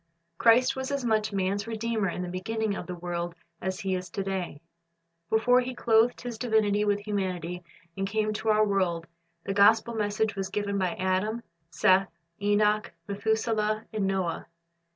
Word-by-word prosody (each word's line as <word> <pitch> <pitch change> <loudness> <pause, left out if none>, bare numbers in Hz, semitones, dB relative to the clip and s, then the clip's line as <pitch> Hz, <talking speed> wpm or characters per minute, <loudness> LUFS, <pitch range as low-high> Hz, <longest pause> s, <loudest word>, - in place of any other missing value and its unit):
Christ 240 +2 +5
was 265 0 -3
as 280 -3 -2
much 215 -2 +1
man's 200 +2 -1
Redeemer 225 -3 -1
in 180 - -4
the - - -4
beginning 205 +4 -2
of - - -6
the 180 - -4
world 175 -1 -4 0.3
as 190 +2 -3
He 190 -2 -1
is 185 -1 -3
to 195 +3 -3
day. 190 -6 -3 0.7
Before 245 +3 +4
He 255 0 -5
clothed 230 0 +3
His 240 -3 -6
divinity 215 -4 +2
with 205 -1 +1
humanity 180 -4 -3 0.3
and 195 0 -2
came 215 0 0
to 220 +1 -2
our 215 0 +5
world, 185 -5 0 0.4
the 195 - -2
gospel 220 +3 +5
message 215 0 0
was 195 -1 -3
given 200 0 -1
by 185 +1 0
Adam, 200 +4 -1 0.3
Seth, 185 +4 +3 0.3
Enoch, 210 +1 +2 0.2
Methuselah, 215 +1 0
and 205 -3 0
Noah. 190 -4 -1
205 Hz, 165 wpm, -28 LUFS, 190-220 Hz, 0.7 s, Christ